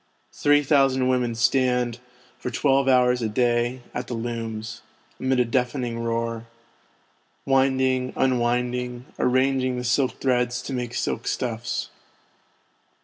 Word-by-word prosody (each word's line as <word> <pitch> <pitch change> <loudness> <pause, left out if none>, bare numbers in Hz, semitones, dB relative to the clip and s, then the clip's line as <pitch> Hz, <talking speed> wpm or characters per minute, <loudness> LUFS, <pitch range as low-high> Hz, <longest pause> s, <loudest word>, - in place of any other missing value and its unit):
Three 145 0 +3
thousand 135 -2 +3
women 125 -2 +1
stand, 125 -1 +1 0.4
for - - -4
twelve 135 +2 +2
hours 125 -1 +4
a 110 - -1
day, 120 +2 +1
at 125 0 -4
the 120 - -4
looms, 115 -1 -5 0.4
amid 130 -1 +1
a 125 - +4
deafening 125 0 -1
roar; 115 0 -2 1.0
winding, 130 -1 +2
unwinding, 125 -1 0
arranging 130 0 +2
the 125 - -3
silk 125 +2 +1
threads 125 -1 0
to 135 - -5
make 120 -2 -3
silk - - -2
stuffs. 120 -1 -2
125 Hz, 120 wpm, -24 LUFS, 120-130 Hz, 1.0 s, hours